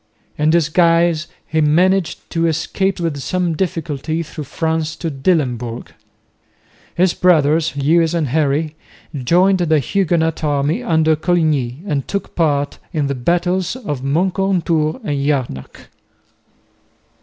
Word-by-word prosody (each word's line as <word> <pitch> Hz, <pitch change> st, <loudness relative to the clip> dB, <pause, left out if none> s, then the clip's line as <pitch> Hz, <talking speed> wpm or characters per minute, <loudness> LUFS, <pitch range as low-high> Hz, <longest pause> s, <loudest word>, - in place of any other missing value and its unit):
In 150 Hz, +1 st, +1 dB
disguise 165 Hz, 0 st, +3 dB, 0.2 s
he 160 Hz, +1 st, 0 dB
managed 175 Hz, +4 st, +2 dB
to 165 Hz, 0 st, +1 dB
escape 180 Hz, +4 st, -1 dB
with 165 Hz, -4 st, -2 dB
some 175 Hz, +6 st, -1 dB
difficulty 165 Hz, -3 st, -2 dB
through 155 Hz, -1 st, -8 dB
France 160 Hz, +2 st, -2 dB
to 165 Hz, -2 st, -4 dB
Dillenburg. 130 Hz, -6 st, -1 dB, 1.1 s
His 180 Hz, 0 st, +3 dB
brothers, 160 Hz, -3 st, +2 dB
Lewis 165 Hz, +4 st, +2 dB
and 155 Hz, -5 st, 0 dB
Henry, 150 Hz, +2 st, 0 dB, 0.4 s
joined 175 Hz, +8 st, +2 dB
the 160 Hz, -3 st, +2 dB
Huguenot 165 Hz, +1 st, 0 dB
army 145 Hz, -, 0 dB
under 160 Hz, -8 st, +2 dB
Coligny 155 Hz, -5 st, 0 dB
and 145 Hz, -8 st, -2 dB
took 200 Hz, -, -4 dB
part 145 Hz, -4 st, 0 dB
in 150 Hz, -3 st, -1 dB
the 140 Hz, -, -1 dB
battles 175 Hz, -, 0 dB
of 175 Hz, -, -5 dB
Moncontour 170 Hz, -, 0 dB
and 145 Hz, -8 st, -2 dB
Jarnac. 130 Hz, -, -3 dB
160 Hz, 120 wpm, -18 LUFS, 145-175 Hz, 1.1 s, disguise